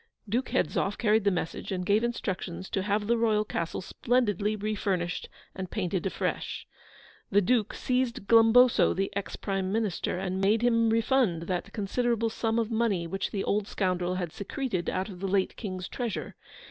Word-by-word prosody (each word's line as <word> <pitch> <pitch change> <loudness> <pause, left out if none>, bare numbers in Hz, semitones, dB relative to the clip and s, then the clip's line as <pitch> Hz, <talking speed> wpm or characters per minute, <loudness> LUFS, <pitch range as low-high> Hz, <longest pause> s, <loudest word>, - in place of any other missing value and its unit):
Duke 240 +5 -1
Hedzoff 195 +6 0
carried 215 -2 +2
the - - +6
message, 180 +1 -3
and 180 -1 -2
gave 205 +4 +3
instructions 190 -6 -3
to 195 - 0
have 205 +1 0
the 235 +2 +2
Royal 215 -2 +2
Castle 170 -5 -3
splendidly 215 -1 0
refurnished 200 -4 -2 0.2
and 190 -1 -5
painted 190 -2 -1
afresh. - - -3 0.6
The 200 - +4
Duke 220 +1 +1
seized 250 -3 -1
Glumboso, 230 +2 +6
the 195 +1 -2
Ex 200 0 -3
Prime 195 -2 -2
Minister, 210 -4 -1
and 190 0 -2
made 210 +4 +3
him 230 -1 +4
refund 225 -6 +2
that 180 +3 -3
considerable 230 +2 0
sum 225 0 -1
of 230 0 0
money 220 -6 +1
which 195 +4 -2
the 195 - -2
old 205 0 0
scoundrel 180 -3 -1
had 175 -3 -3
secreted 200 - -3
out 185 +1 -1
of 190 -4 -9
the 195 - -2
late 190 0 +1
King's 185 -4 -5
treasure. 235 -6 -4
205 Hz, 170 wpm, -28 LUFS, 185-230 Hz, 0.6 s, the